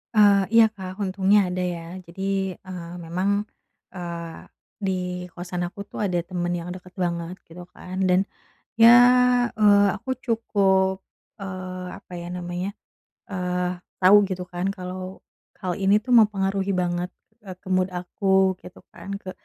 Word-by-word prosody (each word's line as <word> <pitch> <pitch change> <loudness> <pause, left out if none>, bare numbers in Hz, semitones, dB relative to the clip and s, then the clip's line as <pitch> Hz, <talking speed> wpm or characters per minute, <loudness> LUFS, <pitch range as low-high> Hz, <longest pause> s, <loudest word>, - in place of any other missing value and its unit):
Eee, 205 -2 +6
iya 230 -1 +9
Kak 185 -3 -8
untungnya 195 0 +3
ada 180 - -3
ya 175 -2 -2 0.2
jadi, 190 +1 -3
eee, 175 -2 -9
memang, 195 +5 0 0.5
eee, 170 -2 -6 0.4
di 190 -3 -1 0.3
kosan 175 0 -4
aku 195 +3 -9
tuh - - -8
ada 180 -3 0
temen 175 0 -3
yang 175 0 -5
deket 180 0 -10
banget 170 -1 -2
gitu 175 +2 -10
kan, 185 +1 -8
dan 180 +1 +4 0.5
ya, 225 0 +8 0.7
eee, 205 -2 +5
aku 235 +6 -5
cukup, 195 -5 +1 0.4
eee, 185 -1 -6
apa - - -14
ya 170 - -7
namanya, 180 +2 -4 0.6
eee, 180 -1 -2 0.2
tau 190 +3 +8
gitu 185 -1 -4
kan 180 +1 -3
kalau 185 0 -7 0.4
hal 180 -2 -2
ini 195 +1 +4
tuh 250 - -8
mempengaruhi 195 -3 +2
banget 180 0 -1 0.2
ke, - - -36 0.2
eee, 185 - -15
mood 185 0 +2
aku 190 +1 +1
gitu 180 - -13
kan, 200 - -8
ke 185 - -7
185 Hz, 145 wpm, -24 LUFS, 180-195 Hz, 0.7 s, iya